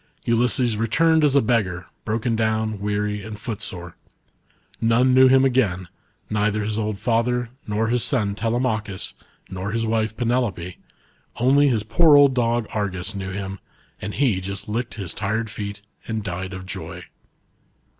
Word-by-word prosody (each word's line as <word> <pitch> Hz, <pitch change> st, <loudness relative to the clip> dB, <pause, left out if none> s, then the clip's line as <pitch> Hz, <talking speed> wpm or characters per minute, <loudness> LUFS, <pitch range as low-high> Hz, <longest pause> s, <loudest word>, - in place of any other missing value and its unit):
Ulys3es 120 Hz, -1 st, +2 dB
returned 160 Hz, +8 st, +3 dB
as 145 Hz, -2 st, +3 dB
a 140 Hz, -, +5 dB
beggar, 95 Hz, -7 st, 0 dB, 0.2 s
broken 115 Hz, +2 st, 0 dB
down, 110 Hz, -1 st, 0 dB
weary, 105 Hz, 0 st, -1 dB
and 105 Hz, +1 st, -7 dB
footsore. 95 Hz, -6 st, -6 dB, 0.9 s
None 120 Hz, +3 st, +3 dB
knew 130 Hz, 0 st, +7 dB
him 130 Hz, +1 st, +5 dB
again, 100 Hz, -9 st, +1 dB, 0.4 s
neither 105 Hz, 0 st, 0 dB
his 110 Hz, +1 st, -2 dB
old 105 Hz, -1 st, -2 dB
father, 120 Hz, +2 st, 0 dB, 0.2 s
nor 110 Hz, +2 st, 0 dB
hia 125 Hz, +1 st, +2 dB
son 115 Hz, -4 st, +1 dB
Telemachus, 110 Hz, -3 st, -1 dB, 0.3 s
nor 95 Hz, +2 st, -5 dB
his 115 Hz, +1 st, -1 dB
wife 110 Hz, 0 st, 0 dB
Penelope, 115 Hz, -8 st, -1 dB, 0.6 s
only 135 Hz, +4 st, +4 dB
his 115 Hz, -6 st, +1 dB
poor 150 Hz, +7 st, +5 dB
old 140 Hz, -2 st, +6 dB
dog 120 Hz, -2 st, +1 dB
Argus 100 Hz, -2 st, -2 dB
knew 95 Hz, -1 st, -5 dB
him, 95 Hz, 0 st, -5 dB, 0.4 s
and 105 Hz, -, -5 dB
he 120 Hz, -10 st, +2 dB
just 100 Hz, +2 st, -6 dB
licked 115 Hz, +3 st, -3 dB
his 100 Hz, -5 st, -4 dB
tired 110 Hz, +2 st, -2 dB
feet 100 Hz, -2 st, -6 dB, 0.3 s
and 110 Hz, -2 st, -2 dB
died 95 Hz, 0 st, -4 dB
of 95 Hz, 0 st, -8 dB
joy. -, -, -6 dB
110 Hz, 150 wpm, -23 LUFS, 100-120 Hz, 0.9 s, knew